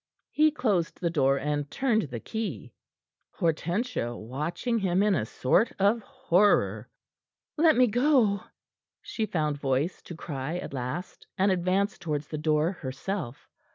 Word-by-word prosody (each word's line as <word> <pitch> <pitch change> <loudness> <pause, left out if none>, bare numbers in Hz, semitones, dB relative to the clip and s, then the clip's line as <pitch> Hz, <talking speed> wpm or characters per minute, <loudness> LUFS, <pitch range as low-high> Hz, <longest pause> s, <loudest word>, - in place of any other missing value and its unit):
He 310 +1 +4
closed 210 - -1
the 170 -2 0
door, 135 -4 +3
and 145 0 -2
turned 225 - 0
the 120 -3 -5
key, 200 - -5 0.6
Hortensia 170 - -1
watching 155 - -2
him 190 -1 +2
in 210 -1 +3
a 110 - 0
sort 165 - +2
of 205 +4 +3
horror. 210 -6 +2 0.7
"Let 315 0 +5
me 255 - +6
go!" 245 -4 +3 0.6
she 225 - -3
found 155 -6 -1
voice 140 +5 -1
to 175 - -9
cry 150 0 -4
at 180 - -6
last, 130 +8 -5
and 195 +1 +3
advanced 185 +3 0
towards 150 -3 -3
the 155 - -4
door 155 +2 +2
herself. 135 -2 -5
175 Hz, 140 wpm, -27 LUFS, 145-215 Hz, 0.7 s, me